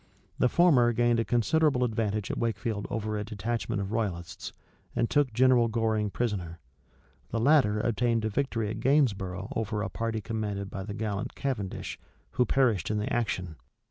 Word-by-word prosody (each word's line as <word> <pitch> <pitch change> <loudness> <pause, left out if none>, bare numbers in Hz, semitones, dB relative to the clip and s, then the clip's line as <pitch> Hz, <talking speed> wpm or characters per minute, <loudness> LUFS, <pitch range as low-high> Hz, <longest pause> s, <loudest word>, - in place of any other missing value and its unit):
The 125 - +4
former 130 -9 +5
gained 120 0 +2
a - - +2
considerable 125 +3 +2
advantage 110 -3 -1
at - - -4
Wakefield 110 -2 -2
over 110 -1 -2
a - - -2
detachment 110 +1 -3
of 100 +1 -4
royalists, 95 -7 -3 0.4
and 120 - +2
took 145 -1 +2
General 125 0 +4
Goring 110 -2 0
prisoner: 95 -7 -3 0.7
the 115 - -1
latter 120 -5 +4
obtained 115 0 +1
a - - +1
victory 115 -3 -1
at 110 - -5
Gainsborough 100 -8 +1
over 105 -1 -1
a - - -2
party 115 -1 -2
commanded 105 -2 -3
by 95 - -5
the 105 0 -5
gallant 105 -1 -3
Cavendish, 120 -9 -3 0.3
who 125 - +1
perished 120 - +2
in 105 - 0
the 105 - -2
action. 90 -8 -2
110 Hz, 165 wpm, -28 LUFS, 105-120 Hz, 0.7 s, former